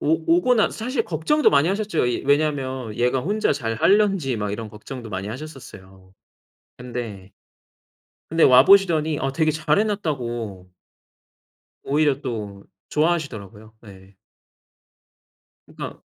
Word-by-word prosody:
오 160 +2 +2
오고 250 +8 +3
나서 220 -3 +2
사실 235 +1 -2
걱정도 175 - +2
많이 145 +4 +3
하셨죠. 200 -5 -1
이 120 - -2
왜냐하면 135 -5 0
얘가 125 +2 +1
혼자 205 +10 0
잘할는지 145 - +1
막 105 -1 -3
이런 110 +1 -5
걱정도 115 +3 -9
많이 95 -1 -5
하셨었어요. 105 -8 -11 0.7
근데 115 -6 -7 1.0
근데 165 +1 +3
와보시더니 155 +2 +5
어 135 - -1
되게 155 +2 +1
잘해 155 +7 +1
놨다고 120 - -4 1.1
오히려 145 -1 +1
또 105 -7 -6 0.2
좋아하시더라고요. 115 - -2
네. 95 -2 -15 1.5
그러니까 - - -9
135 Hz, 280 characters per minute, -22 LUFS, 110-160 Hz, 1.5 s, 와보시더니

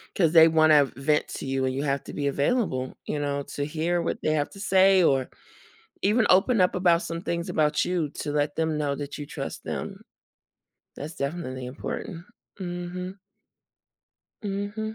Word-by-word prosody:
'Cause 165 -5 +3
they 160 -1 +9
wanna 155 -2 +5
vent 150 +3 +1
to - - -6
you 135 0 -1
and 130 0 0
you 135 - -2
have 140 -1 -1
to - - -8
be 145 - -2
available, 140 - 0
you - - -2
know, 140 -1 -1
to 145 - -1
hear 165 +3 -1
what 165 - -2
they 155 - +1
have 145 -2 0
to 195 - -12
say 190 -2 +5
or 135 -5 +2 0.7
even 215 +3 +3
open 200 +5 +4
up 180 -1 +3
about 175 -2 +3
some 165 -1 -5
things 170 -1 -3
about 150 -1 +1
you 175 -4 -1
to 145 +1 -5
let 145 0 0
them 160 -1 0
know 145 -2 0
that 145 +1 -6
you 145 - -6
trust - - -6
them. - - -5 0.9
That's 150 +3 -7
definitely 140 -3 -4
important. 165 - -6 0.4
Mhm. 180 +1 -5 1.3
Mhm. 205 +2 -3
160 Hz, 175 wpm, -26 LUFS, 145-180 Hz, 1.3 s, they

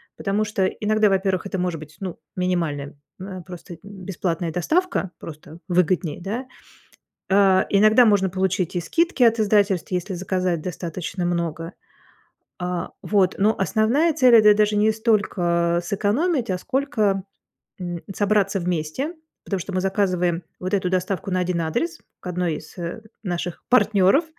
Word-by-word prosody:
Потому 205 +1 0
что 210 -3 0
иногда, 215 +1 +1
во-первых, 190 -1 0
это 195 - -3
может 180 -3 -2
быть, 155 0 -12
ну, 185 -3 -5 0.2
минимальная, 165 -6 -1 0.3
э, 185 -1 -6
просто 180 -1 -9
бесплатная 185 -4 -3
доставка, 250 - 0
просто 155 +1 -11
выгоднее, 180 -2 +1
да? 220 +8 -4 0.8
Э, 195 -1 +4
иногда 215 +4 +6
можно 200 -3 +3
получить 185 -1 -1
и - - +1
скидки 330 - +1
от 230 -1 +4
издательств, 200 -4 +2
если 180 +2 -2
заказать 185 -2 -1
достаточно 175 +1 -4
много. 170 -1 -2 0.8
А, 180 -1 -3
вот, 195 -3 +2
но 210 +3 +3
основная 225 - +2
цель- 255 -5 +5
это 210 -2 +8
даже 210 0 +2
не 215 +1 +4
столько 175 -6 +1
сэкономить, 230 - 0
а 185 - 0
сколько, 215 -5 0 0.6
м, 175 -2 -5
собраться 205 -1 +1
вместе, 180 - -2 0.3
потому 195 -2 -2
что 195 - -6
мы 185 - 0
заказываем 180 -3 0 0.2
вот 185 +2 -2
эту 185 -2 0
доставку 185 +1 -1
на 185 - +1
1 180 -1 -1
адрес 330 - -2 0.2
к - - -15
1 180 -3 -1
из, 155 - -12
э, 175 +5 -5 0.2
наших 175 -3 -4
партнеров, 220 - +4
190 Hz, 145 wpm, -23 LUFS, 175-210 Hz, 0.8 s, это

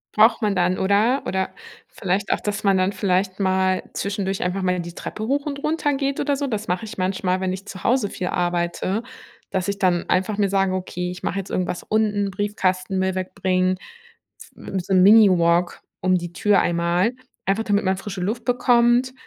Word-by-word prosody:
Braucht 220 +2 +5
man 205 -2 +1
dann, 180 0 +1
oder? 210 +7 +2
Oder 190 0 -1 0.4
vielleicht 195 +1 -2
auch - - +1
dass 205 -1 -3
man 195 -2 +3
dann 185 +1 +2
vielleicht 185 0 0
mal 190 -1 +1
zwischendurch 195 -1 -2
einfach 180 +2 -1
mal 180 -1 0
die 170 0 -6
Treppe 215 - -6
hoch 280 +3 0
und 280 -1 -4
runter 305 -2 0
geht 275 0 -1
oder 285 0 +1
so. 285 +1 -2
Das 220 -5 -3
mache 180 +5 -1
ich 215 -2 -9
manchmal, 185 0 0
wenn 185 -1 0
ich 190 +2 -6
zu 185 - -9
Hause 240 -5 +2
viel 180 - -4
arbeite, 175 +3 -1 0.5
dass 190 -1 -2
ich 200 0 -2
dann 180 -3 +1
einfach 200 +3 +1
mir 200 -2 +2
sage: 195 -1 +1
„Okay, 180 -1 -4
ich 180 0 -8
mache 195 - -1
jetzt 195 - -6
irgendwas 180 -1 -2
unten, 210 -2 0
Briefkasten, 190 -2 -1
Müll 190 0 0
wegbringen“, 185 0 0 0.8
hm, 190 - -5
so 190 +2 -3
'n 185 - +5
Mini-Walk 180 -5 +5 0.2
um 185 0 +3
die 175 -1 -6
Tür 205 +3 +3
einmal, 175 +6 +1 0.3
einfach 200 +3 +1
damit 205 -2 +1
man 190 0 +1
frische 195 -1 -6
Luft 225 +6 -3
bekommt, 245 +1 +3
195 Hz, 195 wpm, -22 LUFS, 185-215 Hz, 0.8 s, Braucht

